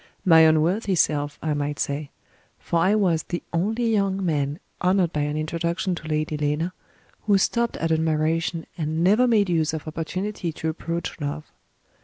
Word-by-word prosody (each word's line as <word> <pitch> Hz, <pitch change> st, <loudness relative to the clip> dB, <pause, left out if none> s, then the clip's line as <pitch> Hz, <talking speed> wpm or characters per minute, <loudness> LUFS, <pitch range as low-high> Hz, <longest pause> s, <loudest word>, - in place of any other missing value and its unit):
My 165 Hz, -3 st, +7 dB
unworthy 165 Hz, +6 st, +3 dB
self, 145 Hz, -3 st, +1 dB
I 155 Hz, -1 st, 0 dB
might 145 Hz, 0 st, -2 dB
say; 140 Hz, +1 st, -2 dB, 0.5 s
for 170 Hz, -, -1 dB
I 190 Hz, +5 st, +3 dB
was 180 Hz, -6 st, +2 dB
the 175 Hz, +2 st, -5 dB
only 220 Hz, +8 st, 0 dB
young 195 Hz, -2 st, +1 dB
man, 145 Hz, -3 st, 0 dB, 0.2 s
honored 180 Hz, -2 st, +2 dB
by 150 Hz, -, -1 dB
an 150 Hz, +1 st, -1 dB
introduction 170 Hz, +4 st, -1 dB
to 170 Hz, -2 st, -7 dB
Lady 155 Hz, 0 st, -1 dB
Lena, 150 Hz, +4 st, -1 dB, 0.5 s
who 200 Hz, -1 st, +5 dB
stopped 235 Hz, +4 st, 0 dB
at 165 Hz, 0 st, -1 dB
admiration, 160 Hz, +1 st, 0 dB
and 160 Hz, +1 st, -1 dB
never 215 Hz, +7 st, +4 dB
made 215 Hz, -4 st, +3 dB
use 160 Hz, -3 st, +1 dB
of 155 Hz, -, -7 dB
opportunity 175 Hz, +3 st, -3 dB
to 160 Hz, -, -3 dB
approach 170 Hz, +1 st, -4 dB
love. 145 Hz, +1 st, -4 dB
165 Hz, 165 wpm, -24 LUFS, 155-185 Hz, 0.5 s, My